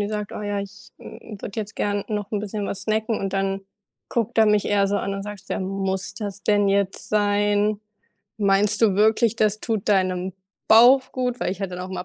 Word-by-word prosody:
die 205 - -1
sagt: 210 -1 -4
„Oh - - -6
ja, 205 -1 -2
ich, 200 +2 -10
hm, 210 -3 -11
würde 200 - -6
jetzt 215 +1 -8
gerne 205 -1 -1
noch 210 -2 -3
'n 210 - 0
bisschen 205 0 -4
was 195 - -3
snacken“ 220 +1 -1
und 195 -1 -3
dann 195 0 -1 0.5
guckt 235 0 -2
er 220 - +6
mich 210 -1 +3
eher 200 -1 +2
so 205 - 0
an 200 0 -2
und 195 - -4
sagt: 205 -1 -8
„Ja, - - -2
muss 190 0 -3
das 205 -2 -6
denn 205 -1 +2
jetzt 195 -1 0
sein? 205 0 +1 0.6
Meinst 205 +1 +2
du 205 -4 +4
wirklich, 220 +2 +3
das 215 -1 +1
tut 220 -4 -2
deinem 185 -2 +1 0.4
Bauch 250 +4 +6
gut?“ 250 -1 -2
Weil - - 0
ich 195 - -10
halt 195 - -3
dann 180 - -5
auch 185 - -6
immer 180 -1 -5
205 Hz, 220 wpm, -23 LUFS, 195-215 Hz, 0.6 s, er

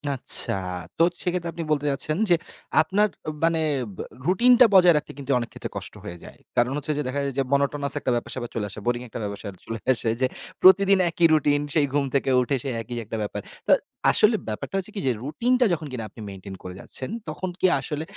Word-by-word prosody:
আচ্ছা, 130 - +2 0.4
তো - - +5 0.2
সেক্ষেত্রে 175 -1 -1
আপনি 170 - -4
বলতে 150 -1 +1
চাচ্ছেন 155 +3 -2
যে 175 - +6 0.5
আপনার 195 +7 +2 0.4
মানে 165 0 +3 0.7
রুটিনটা 245 +8 +6
বজায় 180 -2 +7
রাখতে 150 - -4 0.3
অনেক 120 -1 -4
ক্ষেত্রে - - -6
কষ্ট - - -6
হয়ে 85 - -6
যায়। - - -13 0.2
কারণ 120 +1 +3
হচ্ছে 150 +1 -3
যে - - 0
দেখা 135 +3 -2 0.2
যায় 135 -1 0
monotonous 140 0 +1
একটা 130 - -1
ব্যাপার 120 - -3
সেপার 120 -2 -4
চলে 110 -3 -1
আসে, 100 - -7
boring 120 0 0
একটা 115 - -7
ব্যাপার 100 0 -4 0.3
চলে 115 0 -5
আসে 115 -2 0
যে, - - +5 0.4
প্রতিদিন 195 +1 +7
একই 170 0 +2
রুটিন, 145 -1 +3
সেই 155 -3 +3
ঘুম 145 -1 +2
থেকে 135 - +1
উঠে 130 +3 0
সেই 135 - -2
একই 120 +2 -7
একটা 110 - -5
ব্যাপার। 105 0 -4 0.3
তো - - +3 0.4
আসলে 215 +2 +4
ব্যাপারটা 110 - -4
হচ্ছে 195 +2 -3
কি - - -2
যে - - +4
রুটিনটা 245 - +2
যখন 155 -2 -3
কিনা 125 -3 -4
আপনি 110 - -12
maintain 95 0 -9
করে 90 - -7
যাচ্ছেন, 130 - -5 0.2
তখন 185 +4 -4
কি - - +4
আসলে 150 0 -4
145 Hz, 200 wpm, -24 LUFS, 120-175 Hz, 0.7 s, বজায়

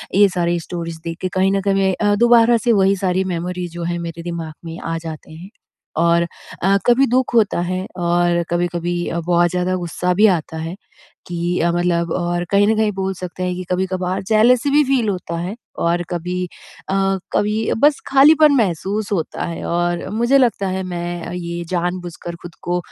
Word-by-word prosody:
ये 200 +1 +7
सारी 175 -1 0
स्टोरीज़ 165 -1 -6
देख 165 0 -5
के 185 - 0
कहीं 190 +1 +3
न 195 0 +1
कहीं 195 0 +1
मैं 190 -1 +2 0.2
अ, - - +3
दोबारा 235 +1 +5
से 235 +1 +1
वही 195 +1 +4
सारी 185 0 0
मेमोरीज़ 175 0 -4
जो 175 - -5
है, 175 +1 -2
मेरे 170 0 -6
दिमाग 165 -2 -5
में 165 0 -7
आ 165 0 -3
जाते 160 -1 -8
हैं 175 +5 -10 0.5
और 170 +1 +3 0.4
अ, 195 +1 +4
कभी 245 +3 +5
दुख 255 +1 +1
होता 210 -6 +3
है 185 +2 -2
और 175 0 +1
कभी-कभी 175 0 -1
अ, 170 - -2
बहुत 175 +1 +2
ज़्यादा 180 +1 0
गुस्सा 180 0 -1
भी 210 +4 +5
आता 160 0 -8
है 165 +2 -5 0.5
कि 175 0 -2
अ, 170 +1 +2
मतलब 170 -1 0
और 175 0 -1
कहीं 205 +1 +4
न 220 - +3
कहीं 215 -1 +2
बोल 190 0 -2
सकते 180 0 -6
हैं 180 0 -1
कि 185 - -5
कभी-कभार 185 0 -1
जेलेसी 235 +5 +4
भी 295 +1 +5
फ़ील 260 -4 +1
होता 180 -3 -3
है 180 +5 -4 0.3
और 170 +1 +1
कभी 180 +1 -2 0.4
अ, - - 0 0.4
कभी 215 +2 +1
बस 290 +4 +4
खालीपन 300 +2 +6
महसूस 205 - -1
होता 170 -6 -2
है 170 - -5
और 175 0 -1
मुझे 235 +5 +3
लगता 235 -6 +2
है, 190 0 -2
मैं 175 -1 -4
अ, - - -6
ये 170 -1 -4
जानबूझकर 175 -1 -3
खुद 175 -1 -10
को 175 0 0
180 Hz, 195 wpm, -19 LUFS, 170-200 Hz, 0.5 s, ये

